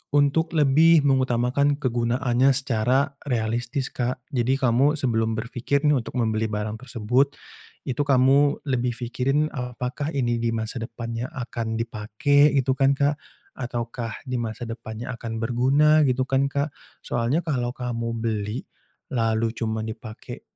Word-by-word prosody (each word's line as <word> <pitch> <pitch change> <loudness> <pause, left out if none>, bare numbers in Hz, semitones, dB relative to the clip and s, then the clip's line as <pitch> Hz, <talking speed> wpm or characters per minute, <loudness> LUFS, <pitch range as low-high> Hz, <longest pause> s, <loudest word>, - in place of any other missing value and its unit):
untuk 145 +3 +2
lebih 155 +2 +5
mengutamakan 130 +1 +2
kegunaannya 120 +1 +2
secara 135 +2 +1
realistis 120 +2 -1
Kak. 125 0 -3
Jadi, 130 -1 +1
kamu 130 +5 +3
sebelum 115 -5 0
berfikir 125 +4 -1
nih 150 - +5
untuk 115 - -8
membeli 110 -1 +1
barang 105 +1 -3
tersebut, 130 +3 +1 0.5
itu 130 +2 -3
kamu 140 +2 +4
lebih 125 -2 0
fikirin, 135 +5 0
"Apakah 125 +3 -4
ini 120 -3 +1
di 115 0 0
masa 110 +3 -3
depannya 115 +1 -5
akan 120 -4 -4
dipakai?" 120 +7 +2
Gitu 130 0 +2
kan 135 +1 +4
Kak 145 +1 +2 0.4
ataukah, 120 -2 -4
"di 125 -1 -2
masa 115 +1 -4
depannya 115 +1 -7
akan 115 -1 -5
berguna?" 140 +6 +4
Gitu 130 0 +1
kan 135 +1 +2
Kak. 145 +2 0 0.3
Soalnya 120 +8 0
kalau 125 -6 -1
kamu 115 -2 -3
beli 110 +1 -2 0.5
lalu 115 -2 +1
cuman 110 -2 -2
dipakai 110 0 -8
125 Hz, 135 wpm, -24 LUFS, 115-140 Hz, 0.5 s, lebih